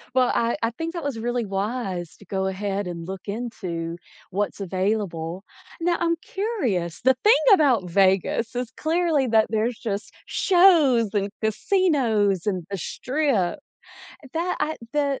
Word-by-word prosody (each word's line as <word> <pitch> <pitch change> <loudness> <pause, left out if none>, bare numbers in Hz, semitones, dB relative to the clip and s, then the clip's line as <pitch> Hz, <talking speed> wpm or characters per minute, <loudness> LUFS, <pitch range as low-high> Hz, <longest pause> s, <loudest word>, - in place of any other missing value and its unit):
Well, 255 -1 +4
I 235 0 +1
I 230 - +1
think 325 +7 -5
that 340 - -5
was 280 -5 -3
really 240 0 -1
wise 195 -3 -3
to 200 - -16
go 190 +1 -1
ahead 195 +1 -2
and 170 -1 -6
look 190 +1 -7
into 185 -7 -4 0.3
what's 205 +2 -2
available. 185 -2 -2 0.4
Now, 345 0 +2
I'm 335 0 +2
curious, 250 - -2
the 260 +1 +5
thing 440 +4 +6
about 250 - +3
Vegas 195 +6 +2
is 245 -1 -3
clearly 320 -4 +1
that 220 -2 +4
there's 220 +1 0
just 205 -3 -4
shows 310 - +4
and 200 -1 0
casinos 220 - +2
and 185 -4 -1
the 195 - -2
strip, 260 - -1 0.8
that 345 +2 -1
I 310 +1 0 0.2
the 285 -2 0
225 Hz, 145 wpm, -24 LUFS, 195-285 Hz, 0.8 s, thing